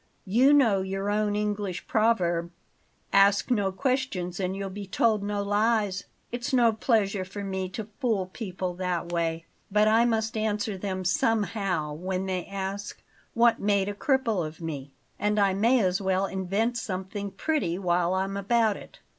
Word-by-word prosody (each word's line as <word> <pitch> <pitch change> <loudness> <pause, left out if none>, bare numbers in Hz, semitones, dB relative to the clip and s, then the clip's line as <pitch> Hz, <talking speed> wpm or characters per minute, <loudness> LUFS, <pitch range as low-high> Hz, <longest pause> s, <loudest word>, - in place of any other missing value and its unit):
You 240 +8 +4
know 230 -10 +4
your 195 +1 -2
own 210 0 +1
English 205 -3 -2
proverb: 180 -7 +1 0.6
'Ask 200 +4 +4
no 205 -5 +2
questions 200 -7 -1
and 185 0 -1
you'll 195 -1 -4
be 200 0 -7
told 215 +2 +2
no 205 0 -2
lies.' 205 -1 +1 0.3
It's 245 +4 -3
no 240 -3 +4
pleasure 215 -4 +1
to 200 +2 -7
me 190 -1 -3
to 210 +2 -6
fool 225 -8 +1
people 185 -2 -5
that 180 -2 -2
way, 165 -1 -1 0.2
but 210 +1 +3
I 225 +2 +5
must 225 -1 0
answer 215 0 -1
them 185 -1 -4
somehow 195 -6 0
when 185 +4 -3
they 185 -2 -3
ask 195 +1 -5 0.3
what 235 0 +4
made 200 -1 +1
a - - -3
cripple 230 - +1
of 155 0 -7
me; 145 -5 -5 0.3
and 210 0 +1
I 200 -2 +3
may 230 +6 +3
as 185 0 +1
well 190 0 +1
invent 200 +6 -1
something 200 0 -4
pretty 235 - -1
while 180 -1 +1
I'm 195 +1 -1
about 220 +1 +2
it. - - -14
200 Hz, 165 wpm, -27 LUFS, 185-220 Hz, 0.6 s, I